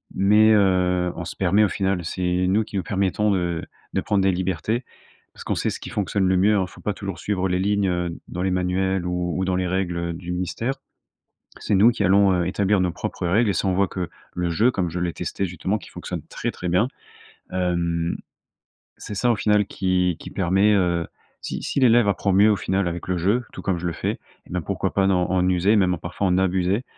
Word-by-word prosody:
mais, 105 +3 +5
heu, 90 -3 +2
on 85 - -5
se - - -7
permet 95 +3 +3
au 105 - +3
final, 95 -2 -1
c'est 90 - -4 0.3
nous 100 +4 +2
qui 105 - -10
nous 95 - -1
permettons 100 +3 0
de 85 -3 -1 0.3
de - - +1
prendre 100 -2 +1
des 95 - +4
libertés 95 +6 -1 0.5
parce - - -11
qu'on - - -1
sait - - -1
ce - - -6
qui - - -8
fonctionne 100 -1 0
le 95 0 +3
mieux. 100 +4 +4
Alors 100 -3 +2
il - - -18
faut - - -14
pas 105 - -1
toujours 100 -2 -6
suivre 95 -2 -1
les 90 - +1
lignes, 100 +1 +1
heu, 90 -1 -1 0.2
dans 90 - -4
les 95 - +1
manuels 90 0 0
ou 90 -1 -2
ou 95 - 0
dans 90 0 0
les 90 0 0
règles, 90 -1 -1
heu, 85 0 -2
du 85 +1 -7
ministère. 90 +8 -2 0.9
C'est - - -1
nous 105 +5 +6
qui 115 -4 -2
allons, 100 +1 +5
heu, 90 -2 +1
établir 100 +2 +1
nos 90 -1 +1
propres 90 - -4
règles 105 +6 +3
et - - +2
ça, - - -1
on 95 - +1
voit 100 +1 +2
que 90 -2 -4 0.3
le 90 -1 -1
jeu, 110 +9 +3
comme 95 -7 -2
je 90 +2 -4
l'ai 90 -1 -1
testé 95 - -3
justement, 90 +3 -2
qui 95 - -14
fonctionne - - -6
très, - - -3
très 90 - -5
bien. 90 +8 +2 0.6
Hem, 85 -2 -1 0.8
c'est 105 - -7
ça 120 +4 +2
au - - +2
final 105 0 +2
qui 90 -3 0
qui - - -9
permet, 95 +3 +2
heu 85 -4 +1 0.3
si - - -5
si - - -1
l'élève 120 -3 +5
apprend 100 0 0
mieux 105 +3 +6
au - - +3
final 95 +1 0
avec 85 0 -6
le 90 -1 0
jeu, 105 +8 +1
tout - - -7
comme 90 -3 -1
je 90 - -3
le 85 - -2
fais, - - -2 0.3
et - - -22
ben, 90 0 -2
pourquoi - - -2
pas 95 -1 +2
dans 90 -2 +2
en 90 0 +2
user, 95 +4 +3
même 90 -3 +3
parfois 90 +3 -2
en 90 0 +2
abuser. 95 +3 +1
95 Hz, 235 wpm, -23 LUFS, 90-100 Hz, 0.9 s, nous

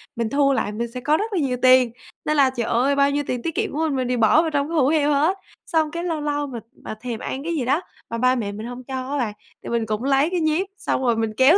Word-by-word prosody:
mình 230 -2 -1
thu 280 +1 +3
lại 210 - -1
mình 230 +2 -4
sẽ 250 - -5
có 300 +4 +2
rất 430 +3 -3
là 370 - +1
nhiều 255 -4 0
tiền. 255 -2 +6 0.3
Nên 305 0 +1
là, 275 -2 +5
trời 245 -3 -3
ơi, 260 +4 +2
bao 280 0 +3
nhiêu 290 +1 0
tiền 250 -1 -2
tiết 330 - -3
kiệm - - -1
của 300 - -3
mình, 305 -4 0
mình 255 -1 -1
đều 250 0 0
bỏ 230 +7 +5
vào 325 -1 -2
trong 285 0 0
cái 335 - -3
hũ 265 -4 +4
heo 295 -1 +2
hết. 310 +7 +2 0.3
Xong 315 -3 +1
cái 340 +2 -4
lâu 325 -4 -2
lâu 290 -1 -1
mà 245 -4 -6 0.2
mà 215 - -5
thèm 235 -2 -4
ăn 270 - -4
cái 335 +2 -2
gì 270 -6 -1
đó, 280 +8 +2 0.3
mà 230 - -3
ba 255 +2 +3
mẹ 215 -5 -2
mình 215 +2 -7
hông 245 +1 -7
cho 260 +1 -5
á 290 - 0
bạn, 230 -5 -1 0.3
thì - - -6
mình 235 -1 0
cũng 215 +2 -2
lấy 275 +3 +3
cái 360 0 -1
nhíp 320 +4 +1
xong - - -1
rồi 240 -2 +3
mình 225 -1 -1
kéo 275 +8 +6
270 Hz, 305 wpm, -22 LUFS, 245-305 Hz, 0.3 s, tiền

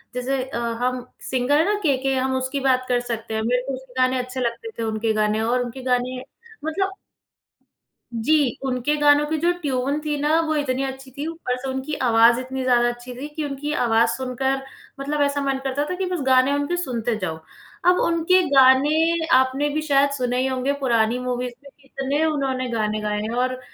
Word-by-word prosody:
जैसे 255 +1 -1
अ, 260 -2 -6 0.2
हम 250 0 -1 0.2
सिंगर 260 +3 +2
है 320 - +3
ना 415 - +1
"के.के.", 270 -3 +1
हम 260 0 0
उसकी 260 +2 -2
बात 255 -1 +2
कर 245 - +3
सकते 235 -2 -5
हैं। 220 - -1
मेरे 245 +3 +1
को 270 - -2
उसके 260 -1 -13
गानें 255 0 +3
अच्छे 255 +1 -5
लगते 245 - -3
थे, - - -1
उनके 220 0 -1
गानें 215 0 +1
और 240 +3 +1
उनके 245 +2 -7
गानें 255 0 -1 0.4
मतलब 385 +5 -1 1.2
जी, 265 +2 +2
उनके 255 +3 0
गानों 290 0 +5
की 315 +1 -1
जो 340 +3 +2
ट्यून 275 0 -1
थी 300 -1 -2
ना, 305 +3 +2
वो 315 -1 -1
इतनी 275 -2 -1
अच्छी 265 0 -6
थी। 290 - -3
ऊपर 325 -6 -3
से 270 - -4
उनकी 265 +3 -4 0.2
आवाज़ 230 +1 +5
इतनी 260 +1 -4
ज़्यादा 240 -1 +3
अच्छी 240 +1 -7
थी 275 +4 -6
कि 310 - -2
उनकी 285 +1 -4
आवाज़ 230 0 +3
सुनकर 265 +1 -1 0.4
मतलब 290 +2 -2
ऐसा 285 0 +1
मन 275 -1 0
करता 275 +2 -1
था 360 - -2
कि 380 +1 -2
बस 355 -4 -1
गानें 260 +1 +5
उनके 285 +5 -1
सुनते 240 -4 -2
जाओ। 160 -1 -3 0.5
अब 360 0 +5
उनके 335 +2 +3
गानें 295 +5 +4
आपने 260 +3 +2
भी 305 +2 -1
शायद 285 -2 +3
सुने 250 -1 -1
ही 265 - +1
होंगे 260 +1 0
पुरानी 235 -2 +1
मूवीज़ 250 0 -3
में 280 - -12
भी। 280 - -26
इतने 275 +3 -1
उन्होंने 270 -4 -1
गानें 215 -2 -1
गाए 210 0 -1
हैं 215 - -3
और 255 +1 -1
260 Hz, 200 wpm, -22 LUFS, 245-290 Hz, 1.2 s, गानों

